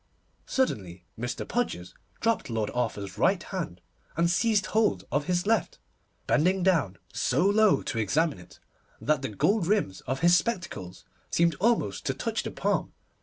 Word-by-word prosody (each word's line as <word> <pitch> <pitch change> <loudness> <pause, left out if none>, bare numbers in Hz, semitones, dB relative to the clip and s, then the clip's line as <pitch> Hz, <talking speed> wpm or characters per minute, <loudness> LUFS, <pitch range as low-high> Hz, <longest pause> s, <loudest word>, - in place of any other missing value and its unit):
Suddenly 95 - -1
Mr. 120 +2 -4
Podgers 160 - -2 0.3
dropped 225 - +1
Lord 110 -2 -1
Arthur's 105 -5 -3
right 190 +3 +3
hand, 170 - -5 0.4
and 170 +1 +3
seized 210 +2 +2
hold 210 - +1
of 145 +3 0
his 180 0 0
left, 220 -3 +1 0.5
bending 180 +4 +2
down 160 - +2 0.2
so 175 - +1
low 210 +1 +4
to 115 - -3
examine 145 - +1
it 90 - -15 0.4
that 150 -3 +1
the 135 - -3
gold 175 - +1
rims 195 - 0
of 130 +2 -2
his 175 +1 +6
spectacles 170 - -3 0.2
seemed 170 0 +3
almost 210 - +1
to - - 0
touch - - -2
the - - -5
palm. - - -1
165 Hz, 155 wpm, -27 LUFS, -, 0.5 s, his